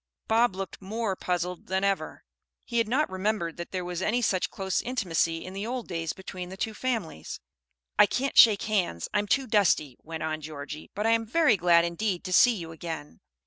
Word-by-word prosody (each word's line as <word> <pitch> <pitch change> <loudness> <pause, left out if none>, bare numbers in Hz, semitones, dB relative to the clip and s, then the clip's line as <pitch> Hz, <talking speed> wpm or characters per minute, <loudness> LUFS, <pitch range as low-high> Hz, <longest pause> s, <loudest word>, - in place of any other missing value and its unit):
Bob 225 -2 +3
looked 195 +1 -6
more 210 +1 -2
puzzled 180 -1 -3
than 190 +1 0
ever. 200 -1 -1 0.4
He 235 -2 0
had 230 - +2
not 275 +7 +2
remembered 190 -3 -2
that 175 - -6
there 185 -2 -3
was 180 0 -4
any 215 +5 +1
such 195 -6 +1
close 190 -1 -1
intimacy 170 -9 -1
in 185 - -7
the 200 +3 -4
old 250 -1 -4
days 165 -2 -2
between 185 -1 -7
the 190 - -8
two 220 +2 -2
families. 220 - -3 0.6
"I 210 - +8
can't 275 +5 -1
shake 215 -5 +7
hands, 185 - -1
I 210 - +3
am 205 - -2
too 270 +6 +2
dusty," 195 - +2
went 160 0 -6
on 155 0 -2
Georgie. 150 0 -7
"But 210 +2 -2
I 225 - +4
am 225 0 +2
very 310 0 +4
glad 170 -2 +4
indeed 175 +2 -2
to 185 - -4
see 245 +5 +6
you 165 -5 -7
again." 160 - -7
190 Hz, 205 wpm, -27 LUFS, 170-220 Hz, 0.6 s, I